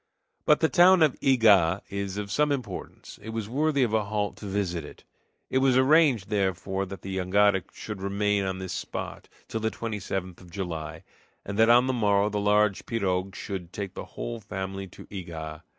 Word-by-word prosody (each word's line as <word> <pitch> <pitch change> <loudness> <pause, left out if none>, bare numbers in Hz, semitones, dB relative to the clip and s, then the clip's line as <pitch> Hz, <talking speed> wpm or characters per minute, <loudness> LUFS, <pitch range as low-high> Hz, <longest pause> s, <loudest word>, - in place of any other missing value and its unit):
But 150 - +4
the 160 - +5
town 175 +1 +6
of 150 -4 +3
Ega 105 -9 +4
is 100 0 -3
of 100 -1 -4
some 150 +6 +2
importance; 135 -4 -6
it 110 - -8
was 110 -2 -4
worthy 140 +3 +1
of 115 -3 0
a 110 -2 +2
halt 105 0 -2
to 105 - -8
visit 95 -4 -2
it. 75 - -12 0.5
It 130 - +3
was 130 -1 +3
arranged, 130 -6 +4
therefore, 95 -1 -1
that 95 -2 -9
the 95 0 -4
jangada 95 +1 +3
should 105 -3 -7
remain 100 +1 0
on 95 -1 -2
this 95 -1 -5
spot - - -6 0.2
till 110 - -3
the 110 0 0
27th 95 -6 -5
of 90 - -14
July, 85 -4 -5 0.4
and 100 - -5
that 110 +1 +6
on 120 +1 +6
the 130 - 0
morrow 105 -3 +2
the 105 - -1
large 105 -1 +2
pirogue 95 -4 -1
should 90 -3 -6
take 95 -2 -5
the - - -7
whole 120 -1 -4
family 95 -1 -5
to 90 - -13
Ega. 80 -5 -7
100 Hz, 190 wpm, -27 LUFS, 95-115 Hz, 0.5 s, town